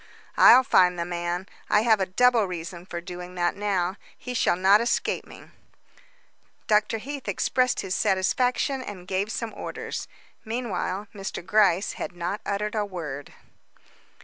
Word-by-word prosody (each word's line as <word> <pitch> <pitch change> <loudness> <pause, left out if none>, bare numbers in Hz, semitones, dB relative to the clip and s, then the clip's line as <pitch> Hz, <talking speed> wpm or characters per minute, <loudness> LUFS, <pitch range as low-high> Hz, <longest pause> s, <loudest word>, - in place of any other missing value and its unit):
"I'll 255 +2 +8
find 180 -6 +4
the 170 - -2
man; 175 +1 -3 0.2
I 210 0 +4
have 220 -3 +4
a 190 - 0
double 240 +3 +3
reason 175 0 -7
for 170 -2 -5
doing 180 0 -8
that 175 -1 0
now; 195 -2 -1 0.2
he 250 - -6
shall 230 - +2
not 195 +4 +5
escape 235 0 -1
me." - - -14 1.1
Dr. 210 +1 +2
Heath 275 +4 -7
expressed 255 -1 +1
his 190 -1 -3
satisfaction, 250 +9 +1
and 190 -7 -8
gave 195 +3 -1
some 230 -1 -4
orders. - - -5 0.4
Meanwhile, 210 -4 -3
Mr. 195 -3 -6
Gryce 200 -1 +3
had 200 - -6
not 175 +4 -4
uttered 210 +1 -2
a 215 -2 0
word. 160 -8 -7
195 Hz, 150 wpm, -25 LUFS, 180-220 Hz, 1.1 s, I'll